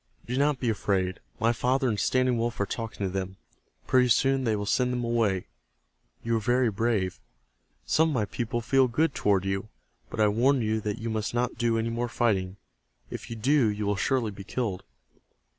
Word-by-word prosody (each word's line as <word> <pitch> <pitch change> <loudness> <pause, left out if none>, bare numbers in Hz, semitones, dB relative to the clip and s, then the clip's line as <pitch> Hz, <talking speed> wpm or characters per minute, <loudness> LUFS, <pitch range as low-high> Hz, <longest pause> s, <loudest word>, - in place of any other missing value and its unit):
Do 125 - -3
not 140 0 +2
be 125 - -2
afraid. 95 -4 0 0.2
My 115 +1 +3
father 130 +3 +1
and 105 -4 0
Standing 130 +2 +2
Wolf 120 0 -2
are 100 - +2
talking 115 -1 -4
to 95 - -3
them. 95 0 -4 0.5
Pretty 125 -1 +4
soon 135 +3 +3
they 110 -2 +2
will 105 0 -3
send 125 +4 +1
them 125 -1 -2
away. 115 -6 +1 0.8
You 115 - -1
were 115 - +2
very 120 +1 +2
brave. 105 -3 0 0.7
Some 160 +1 +3
of 150 - -2
my 110 -4 +1
people 120 +3 -3
feel 130 +3 +3
good 145 +5 +1
toward 95 -2 +1
you. 95 +2 -2 0.4
But - - -7
I 105 - +5
warn 125 +6 +3
you 110 0 0
that 105 0 -3
you 115 -1 -4
must 110 +1 -2
not 125 0 0
do 115 -1 +2
any 115 +1 -1
more 120 +1 -2
fighting. 100 -6 0 0.5
If - - -7
you 115 - -5
do 130 +3 +3
you 105 0 -2
will 100 0 +1
surely 120 +1 0
be 100 0 -9
killed." 100 -3 -3
115 Hz, 200 wpm, -27 LUFS, 105-125 Hz, 0.8 s, I